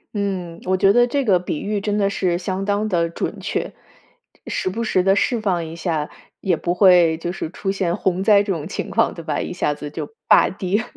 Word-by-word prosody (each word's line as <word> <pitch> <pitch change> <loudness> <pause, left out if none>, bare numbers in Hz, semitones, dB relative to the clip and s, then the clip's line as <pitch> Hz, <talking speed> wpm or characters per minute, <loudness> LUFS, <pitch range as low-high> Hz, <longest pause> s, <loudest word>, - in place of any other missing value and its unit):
嗯， 185 -4 -3
我 185 +1 +1
觉 195 +1 +4
得 240 +1 +5
这 275 +2 -1
个 190 -5 +4
比 175 -4 -4
喻 205 0 -2
真 205 +1 -1
的 200 - +2
是 185 -3 0
相 185 +1 -3
当 205 +1 0
地 170 -4 +1
准 - - -4
确， - - -3 0.7
时 - - -2
不 225 +5 -3
时 190 -4 +2
地 195 +1 +3
释 230 +2 +1
放 180 -5 0
一 160 +1 -8
下， 160 -3 -2 0.3
也 185 -3 +1
不 175 +2 -2
会 175 -4 +5
就 175 +2 -4
是 170 -3 -5
出 195 +2 -3
现 185 -3 -1
洪 190 0 0
灾 205 -2 +5
这 200 -1 -1
种 160 -3 -5
情 - - -5
况， 230 +2 +2
对 170 - -8
吧， 150 -2 -1
一 - - -4
下 175 -4 0
子 145 0 -7
就 145 - -5 0.2
大 - - +6
跌。 200 +3 -1
185 Hz, 245 characters per minute, -21 LUFS, 170-200 Hz, 0.7 s, 大